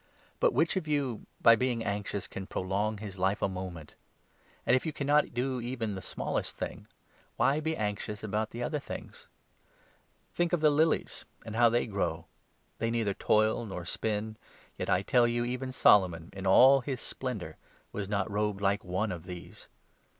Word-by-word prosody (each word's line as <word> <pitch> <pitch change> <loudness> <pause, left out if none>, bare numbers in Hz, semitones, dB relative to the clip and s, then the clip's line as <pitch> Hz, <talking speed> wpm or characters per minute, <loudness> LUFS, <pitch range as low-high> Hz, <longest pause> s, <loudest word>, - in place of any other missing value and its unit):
But - - +4
which 170 - +2
of 160 - -3
you, 140 -6 -1
by 115 - +8
being 120 -1 0
anxious, 100 -1 -2
25 - - -28
can 95 0 -6
prolong 100 +3 -1
his 100 -2 -8
life 95 +3 +1
a - - +4
moment? 90 -4 -7 0.7
And, 125 - +5
if 130 - +1
you 160 - -2
cannot 145 -2 +1
do 125 0 -1
even 120 -2 -3
26 - - -4
the - - -6
smallest - - -2
thing, - - -6 0.5
why 140 +3 +3
be 160 +1 -2
anxious 105 0 -3
about 110 +1 -2
other 125 +6 -2
things? 485 - -9 1.1
Think 175 0 +1
27 - - +7
of 165 - -5
the 155 - +6
lilies, 155 +2 +1 0.2
and 110 - -6
how 120 0 +6
they 120 +1 +1
grow. 100 -3 -2 0.5
They 115 - 0
neither 115 -4 0
toil 110 +3 +2
nor 95 -5 -6
spin; 110 +3 -2 0.4
yet, - - -4
I 90 +1 +3
tell 120 +3 +4
you, 120 0 0
even 125 +1 -3
Solomon 90 -9 +4
in 95 0 -4
all 130 +8 +8
his 130 0 -4
splendour 105 -12 -5 0.3
was 100 -1 -4
nc<: 100 -1 0
robed 105 -1 -1
like 100 +1 +1
one 95 +3 -1
of 85 -2 -6
these. 90 -2 -9
110 Hz, 180 wpm, -30 LUFS, 100-130 Hz, 1.1 s, by